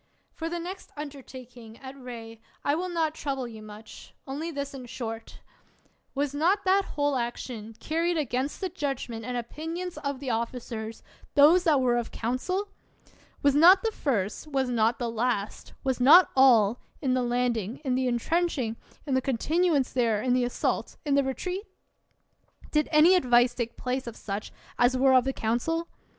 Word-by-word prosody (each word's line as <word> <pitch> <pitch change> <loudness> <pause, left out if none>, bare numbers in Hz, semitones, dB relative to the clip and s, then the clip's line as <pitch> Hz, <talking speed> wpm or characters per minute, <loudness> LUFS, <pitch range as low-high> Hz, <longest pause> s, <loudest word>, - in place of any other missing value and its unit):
For 325 0 -4
the 345 - -3
next 360 +3 -7
undertaking, 255 -5 -10
at 265 0 -10
Rhee, 230 -4 -9 0.2
I 285 - +3
will 360 +4 -2
not 325 -3 0
trouble 270 -5 -3
you 220 -2 -10
much; 215 +1 -12
only 290 +5 -4
this 280 -3 -5
in 255 -2 -8
short: 225 -2 -7 0.7
Was 285 0 -1
not 360 +8 +1
that 385 +1 +4
whole 290 -1 +1
action 235 -2 -4
carried 335 +2 0
against 275 -1 -2
the 375 - -1
judgment 270 -8 -4
and 245 +2 -3
opinions 325 +9 -5
of 280 -2 -3
the 265 -3 -3
officers 225 -1 -4
— - - -26
those 325 +5 +6
that 300 -5 +4
were 245 -1 +2
of 235 -1 -2
council? 365 - -2 0.7
Was 285 -1 +5
not 350 +6 +7
the 450 - +1
first, 230 - -2
was 270 -3 -1
not 230 -1 +2
the 240 - -2
last, 230 -2 -2
was 260 -2 0
not 300 +9 +7
all, 245 -4 +5 0.2
in 260 -3 0
the 255 - +1
landing, 240 -2 -1
in 260 - +1
the 255 0 +1
intrenching, 250 -1 0 0.3
in 280 - -2
the 260 - +3
continuance 290 +3 +1
there, 230 -4 +2
in 250 +3 +1
the 250 0 +2
assault, 245 - -2
in 290 - +1
the 280 0 +4
retreat? 360 +9 -3 1.1
Did 300 -1 +1
any 315 +4 +6
advice 245 -7 +4
take 235 -2 -4
place 255 0 -3
of 235 - -6
such 200 0 -5 0.3
as 245 +1 +4
were 265 +1 +4
of 255 -1 +5
the 270 - +1
council 270 +9 -1
260 Hz, 170 wpm, -27 LUFS, 240-305 Hz, 1.1 s, not